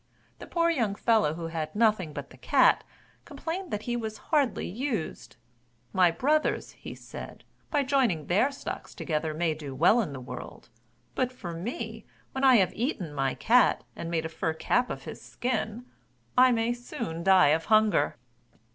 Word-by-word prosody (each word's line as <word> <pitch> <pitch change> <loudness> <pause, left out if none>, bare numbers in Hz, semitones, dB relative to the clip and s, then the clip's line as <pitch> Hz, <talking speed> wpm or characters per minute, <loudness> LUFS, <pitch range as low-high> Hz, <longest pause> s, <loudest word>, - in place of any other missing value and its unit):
The - - -9
poor 335 -1 +2
young 230 -10 0
fellow 215 -10 +2
who 165 -1 -5
had 160 0 -4
nothing 210 -7 +2
but - - -7
the - - -14
cat, - - +4 0.4
complained 355 +2 -5
that 210 0 -3
he 240 - -2
was 220 -2 -4 0.2
hardly 280 -7 +2
used: 225 - -4 0.6
"My 185 -2 +5
brothers," 295 - 0 0.2
said - - -10
he, - - -39 0.2
"by 290 -2 +1
joining 255 - +1
their 200 - +3
stocks 275 - -7
together, 155 -1 -2
may 165 0 +1
do 145 -3 -7
well 180 - +5
in 195 - -4
the 135 - -6
world, 125 -1 -9 0.4
but 255 -1 0
for 180 -9 -7
me, 220 +4 -5 0.3
when 265 - -4
I 260 -2 +7
have 190 -5 +3
eaten 210 - -3
my 135 -2 0
cat, 245 +2 +4
and 165 - -5
made 165 -1 -1
a - - -3
fur 160 0 -2
cap 245 +9 +1
of - - -5
his - - -8
skin, 240 -1 -3 0.5
I 255 0 +6
may 230 0 +1
soon 230 -8 -6
die 185 -5 +6
of 160 +2 +2
hunger!" 215 -8 +3
215 Hz, 175 wpm, -28 LUFS, 165-250 Hz, 0.6 s, I